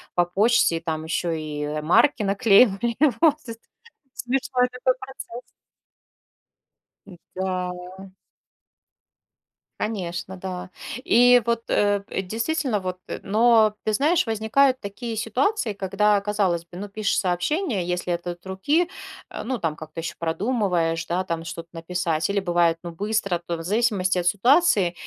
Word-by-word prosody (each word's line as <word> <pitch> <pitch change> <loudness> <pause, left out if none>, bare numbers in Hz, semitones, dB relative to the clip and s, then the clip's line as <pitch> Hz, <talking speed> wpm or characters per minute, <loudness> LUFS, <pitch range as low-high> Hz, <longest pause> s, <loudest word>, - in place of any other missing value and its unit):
по 175 - +4
почте, 200 -1 +3
и - - -4
там 160 -1 -3
ещё 170 +1 -2
и 150 -1 -3
марки 220 - +3
наклеивали, 205 +2 +3 0.2
вот, 305 -2 +4
з 230 -5 -9 0.6
Смешной 255 0 0
такой 250 +1 0
процесс. 250 -2 -9 1.7
М-да. 185 0 -6 1.7
Конечно, 190 -3 -4
да. 180 -1 -6 0.4
И 245 +2 +6
вот, 235 -1 0
э, 205 -1 +2
п 195 -1 -4
действительно, 230 - -1
вот, 185 -1 -4
э. - - -5
Но, 220 +1 +4
ты 215 - +2
знаешь, 305 +7 +2
возникают 240 +5 +2
такие 225 +3 -6
ситуации, 245 - 0
когда, 200 +1 +1
казалось 200 -4 0
бы, 175 +1 -12
ну, 205 +2 -6
пишешь 205 0 0
сообщение, 190 - -1
если 180 0 -2
это 175 +1 -3
от 175 - -15
руки, 285 - +1 0.4
э, - - -6
ну, 260 0 -2
там 165 -5 -2
как-то 155 +1 -8
ещё 165 0 -5
продумываешь, 170 -2 0
да, 180 +2 0
там 165 -2 -4
что-то 165 0 -7
написать. 165 -1 -2
Или 200 0 +1
бывает, 175 -3 +2
ну, 175 - -6
быстро, 195 0 -1
то 170 - -2
в 165 - -7
зависимости 195 -1 +1
от 175 - -5
ситуации. 205 - +4
195 Hz, 140 wpm, -24 LUFS, 175-230 Hz, 1.7 s, И